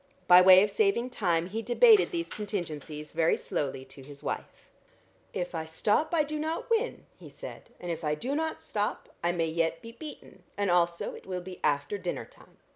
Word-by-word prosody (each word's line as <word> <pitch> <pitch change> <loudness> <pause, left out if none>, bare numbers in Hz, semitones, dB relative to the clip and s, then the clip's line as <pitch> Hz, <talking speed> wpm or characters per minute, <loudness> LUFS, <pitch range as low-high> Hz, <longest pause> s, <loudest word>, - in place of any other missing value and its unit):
By 180 0 +9
way 185 +1 +9
of 210 - 0
saving 395 - +1
time 175 -8 +1
he 220 +4 -3
debated 420 - +6
these 340 -3 -3
contingencies 155 -7 -5
very 165 0 +2
slowly 135 -2 -3
to 135 +1 -13
his 140 +1 -12
wife. - - -5 0.6
"If 180 0 -4
I 160 -1 -3
stop 210 - +1
I 330 -3 +3
do 305 +1 -4
not 320 +9 -3
win," 460 +2 0
he - - -11
said, - - -10
"and 175 - -4
if 165 -1 -5
I 150 0 +1
do 255 - -3
not 320 +2 -2
stop, 205 0 -3
I 175 - +2
may 170 -2 0
yet 165 0 0
be 230 - -10
beaten, 295 +6 -11 0.2
and 200 -2 +1
also 170 -1 +1
it - - -12
will 180 -1 -3
be 185 0 -9
after 145 +7 0
dinner 180 -1 -4
time. - - -20
185 Hz, 200 wpm, -29 LUFS, 165-250 Hz, 0.6 s, By